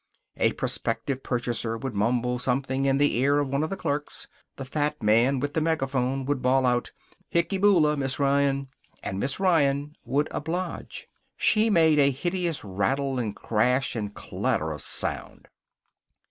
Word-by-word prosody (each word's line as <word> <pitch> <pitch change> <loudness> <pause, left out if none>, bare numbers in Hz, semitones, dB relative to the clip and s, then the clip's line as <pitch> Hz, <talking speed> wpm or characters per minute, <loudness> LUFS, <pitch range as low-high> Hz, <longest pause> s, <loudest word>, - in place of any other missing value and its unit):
A - - +2
prospective 135 -1 -2
purchaser 120 -2 -2
would 130 +1 -5
mumble 120 +4 0
something 130 +1 0
in 135 0 +3
the 145 -3 +2
ear 140 +3 +3
of 145 -2 0
one 140 +2 0
of 155 - -1
the 195 - -4
clerks. 145 -3 -3 0.3
The 135 - -7
fat 145 -2 -2
man 115 +6 +3
with 145 +2 -3
the 160 - 0
megaphone 135 -4 0
would 140 -1 -1
bawl 130 +1 +3
out, 125 -1 +1 0.4
"Hicky 170 +3 0
Boola, 175 -7 +4
Miss 135 -2 -1
Ryan!" 140 -1 +2 0.4
And 95 - -3
Miss 135 - -2
Ryan 145 -6 +2
would 145 +3 0
oblige. 170 +3 -4 0.3
She 220 +1 +3
made 160 -6 +4
a 140 -1 +5
hideous 170 +4 -2
rattle 130 +8 -1
and 110 -4 -3
crash 125 +5 +1
and 105 -3 -3
clatter 80 -5 -2
of 75 -3 -6
sound. - - -1
135 Hz, 160 wpm, -26 LUFS, 125-150 Hz, 0.4 s, a